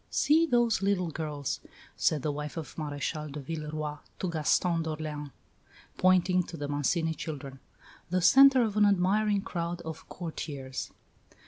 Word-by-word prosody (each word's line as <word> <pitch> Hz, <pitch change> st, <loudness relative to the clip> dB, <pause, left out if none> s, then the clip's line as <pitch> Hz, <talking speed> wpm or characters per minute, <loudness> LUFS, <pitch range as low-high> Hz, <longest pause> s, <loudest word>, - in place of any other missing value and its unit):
"See 320 Hz, +3 st, +3 dB
those 240 Hz, -5 st, +2 dB
little 190 Hz, -4 st, +1 dB
girls," 150 Hz, -3 st, -3 dB, 0.4 s
said 150 Hz, -4 st, +1 dB
the 150 Hz, -, 0 dB
wife 150 Hz, +2 st, -5 dB
of 160 Hz, -, -6 dB
Maréchal 150 Hz, 0 st, -4 dB
de 150 Hz, -, -5 dB
Villeroi 150 Hz, 0 st, -4 dB, 0.2 s
to 185 Hz, -, -2 dB
Gaston 165 Hz, +2 st, +2 dB
d'Orléans, 155 Hz, -2 st, -4 dB, 0.7 s
pointing 185 Hz, 0 st, +4 dB
to 170 Hz, -1 st, -8 dB
the 145 Hz, -1 st, -4 dB
Mancini 160 Hz, +3 st, 0 dB
children, 140 Hz, -4 st, -7 dB, 0.5 s
the 185 Hz, +1 st, +1 dB
centre 270 Hz, +7 st, +7 dB
of 215 Hz, -3 st, -2 dB
an 210 Hz, -, +6 dB
admiring 200 Hz, +2 st, +2 dB
crowd 170 Hz, -4 st, -3 dB
of 160 Hz, -2 st, -8 dB
courtiers. 140 Hz, -6 st, -5 dB
165 Hz, 140 wpm, -29 LUFS, 150-185 Hz, 0.7 s, centre